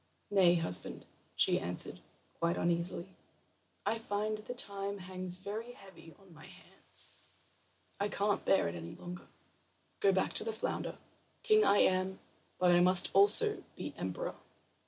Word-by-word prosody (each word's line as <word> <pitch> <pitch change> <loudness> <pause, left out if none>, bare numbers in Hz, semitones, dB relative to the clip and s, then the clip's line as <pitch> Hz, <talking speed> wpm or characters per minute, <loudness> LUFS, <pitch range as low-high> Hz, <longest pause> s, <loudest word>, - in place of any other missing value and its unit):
"Nay, 185 -3 +5
husband," 160 - -3 0.3
she - - +3
answered, - - -3 0.4
quite 170 +1 0
uneasily, 170 +2 -1 0.7
"I 225 - 0
find 215 0 -2
the 235 +4 -7
time 200 -3 -1
hangs 185 -1 -3
very 215 +5 -6
heavy 190 -7 -15
on 195 -3 -19
my 155 - -14
hands. - - -11 0.9
I 200 - +1
can't 205 0 0
bear 195 - +3
it 85 - -4
any 85 -1 -8
longer. 175 0 -9 0.7
Go 200 - +4
back 190 0 0
to - - +6
the 225 - -2
flounder. 220 - -3 0.5
King 430 0 +5
I 205 - +4
am, 185 0 +2 0.4
but 180 -1 +4
I 175 - +5
must 180 +1 +4
also 420 +2 +5
be - - -6
emperor." - - -4
190 Hz, 145 wpm, -33 LUFS, 175-210 Hz, 0.9 s, to